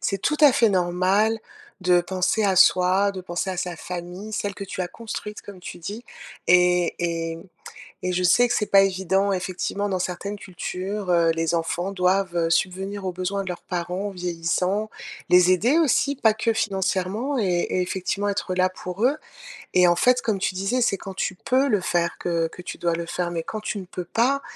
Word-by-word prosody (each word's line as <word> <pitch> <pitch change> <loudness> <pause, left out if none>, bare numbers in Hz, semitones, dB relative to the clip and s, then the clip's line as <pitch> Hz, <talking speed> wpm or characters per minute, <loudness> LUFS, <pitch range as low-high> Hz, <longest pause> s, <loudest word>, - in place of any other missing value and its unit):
C'est 195 - -1
tout 300 - +1
à 295 -3 +8
fait 230 -2 +4
normal 190 +4 +2 0.4
de 180 -1 +4
penser 185 +4 0
à 195 -2 +3
soi, 185 +2 +4
de 190 -1 -6
penser 175 +1 -3
à 185 - -4
sa 180 -1 -3
famille, 180 +5 -7
celle 205 -1 -2
que 200 - -8
tu 185 - -6
as 180 - 0
construite, 210 -1 -7
comme 200 -2 -11
tu 180 - -9
dis 205 +8 -7 0.4
et 180 -1 +4
et 165 -1 -2
mmh, 165 - -11 0.6
et 180 0 -1
je 180 +1 0
sais 240 +7 +5
que - - 0
c'est 210 - +1
pas 195 - +6
évident, 190 +1 +1
effectivement, 190 +2 -2
dans 185 -2 -1
certaines 195 +3 -4
cultures, 190 +2 -5
heu, 170 -2 +4
les 165 0 -1
enfants 170 +3 -1
doivent, 185 -1 +1
heu, 165 -1 +1
subvenir 190 +3 -1
aux 185 - -1
besoins 185 +2 -3
de 185 - -6
leurs 175 - -5
parents 180 +3 -3
vieillissants, 180 +3 -1 0.4
les 180 0 +6
aider 230 - +3
aussi, 280 -2 +2
pas 225 -5 +3
que 220 +1 0
financièrement 200 +5 -1
et 220 - +1 0.3
et 185 - 0
effectivement, 190 +3 -2
être 195 -2 -2
là 185 0 +3
pour 185 +2 -6
eux 275 +5 +3 0.6
et 180 -1 +6
en 175 - +4
fait, 250 +7 +3
comme 215 -3 0
tu 190 - -1
disais, 195 +7 -1
c'est 200 -4 +2
quand 195 -1 -8
tu 190 - -1
peux 260 +8 +1
le 205 -6 +2
faire 170 0 0
que 170 -2 0
que 180 - -11
tu 180 - -7
dois 170 -1 0
le 170 0 -3
faire 175 0 -2
mais 165 - -2
quand 215 +3 -5
tu 215 - -3
ne 190 - -8
peux 180 0 -6
pas, 250 +9 +1
185 Hz, 210 wpm, -24 LUFS, 180-205 Hz, 0.6 s, à